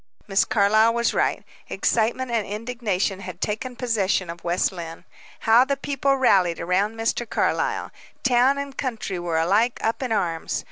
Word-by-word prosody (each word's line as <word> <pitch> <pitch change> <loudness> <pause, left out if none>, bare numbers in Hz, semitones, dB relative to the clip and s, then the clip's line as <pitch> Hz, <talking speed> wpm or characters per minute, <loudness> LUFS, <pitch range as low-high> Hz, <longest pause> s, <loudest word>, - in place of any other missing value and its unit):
Miss 195 -1 +2
Carlyle 215 +2 +3
was 235 0 +1
right. - - 0 0.3
Excitement 240 +3 0
and 230 -2 +1
indignation 210 -3 -2
had 185 -2 -8
taken 230 +4 -3
possession 205 -7 0
of 170 0 -12
West 175 +1 +1
Lynne. 165 -3 -8 0.4
How 225 +3 +6
the 280 +1 -1
people 275 0 0
rallied 190 -10 +3
around 190 +6 0
Mr. 225 +1 -2
Carlyle! - - -1 0.3
Town 255 +2 +3
and 280 -1 -5
country 225 -8 -3
were 170 -2 -2
alike 205 +9 +2
up 225 +4 -1
in 255 -3 -3
arms. 170 -6 -1
220 Hz, 155 wpm, -23 LUFS, 185-245 Hz, 0.4 s, How